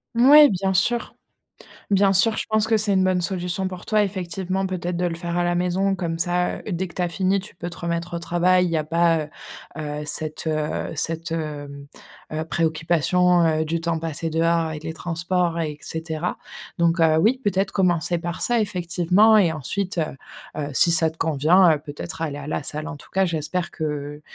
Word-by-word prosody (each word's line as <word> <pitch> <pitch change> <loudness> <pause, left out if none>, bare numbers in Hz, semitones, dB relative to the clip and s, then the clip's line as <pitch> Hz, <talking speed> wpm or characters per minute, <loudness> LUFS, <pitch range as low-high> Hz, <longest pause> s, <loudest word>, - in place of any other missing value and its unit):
Ouais 285 +4 +8
bien 190 0 -1
sûr, 235 +6 0 0.7
bien 195 -1 +4
sûr, 215 +4 +3
je - - -2
pense 215 0 +1
que 220 0 +3
c'est 210 -1 +1
une 190 -1 +3
bonne 185 -1 +2
solution 180 0 -2
pour 185 -1 -9
toi 215 -1 +3
effectivement 190 0 -3
peut-être 180 -1 -3
de 180 +1 -1
le 170 -1 -2
faire 170 0 -4
à - - +1
la 175 0 0
maison 185 +2 +1
comme 170 -3 -3
ça, 180 +1 0
heu, - - -10
dès 185 +1 -2
que 170 - -15
tu - - -3
as 175 - 0
fini, 190 +2 +1
tu 200 +1 -12
peux 170 - -6
te - - -10
remettre 170 0 -3
au - - -5
travail, 180 +2 +2
il - - -1
y 165 - +1
a 155 - 0
pas, 165 +1 +2
heu 150 - -10 0.5
heu, 150 0 -4
cette, 155 +1 -2
heu, 155 -1 -2
cette, 165 +1 -2
hem, 145 -3 -5 0.4
heu, 155 +1 -3
préoccupation, 170 +2 +2
heu, 160 -1 +1
du 165 +1 -2
temps 165 -1 -1
passé 165 0 -4
dehors 165 +1 +1
avec 155 -1 -6
les 160 0 -4
transports 170 +1 -1
et 150 -2 -3
cetera. 160 +1 -4 0.4
Donc 170 0 +2
heu 160 -1 +4
oui, 230 +10 +2
peut-être 195 -1 0
commencer 175 -2 +1
par 175 +1 -5
ça 240 -1 +2
effectivement 185 +2 +3
et 180 -5 +4
ensuite, 180 - -3 0.6
heu, 150 -2 -3
si 170 - +4
ça 160 -1 +3
te 160 - -17
convient, 165 +4 +4
heu, 150 - -2
peut-être 145 +1 -8
aller 145 -3 -3
à 145 - -8
la 150 - -2
salle 150 +3 -5
en 160 -3 -6
tout - - -16
cas, 190 0 +2
j'espère 170 +1 -2
que, 150 -1 -4
170 Hz, 205 wpm, -23 LUFS, 160-185 Hz, 0.7 s, Ouais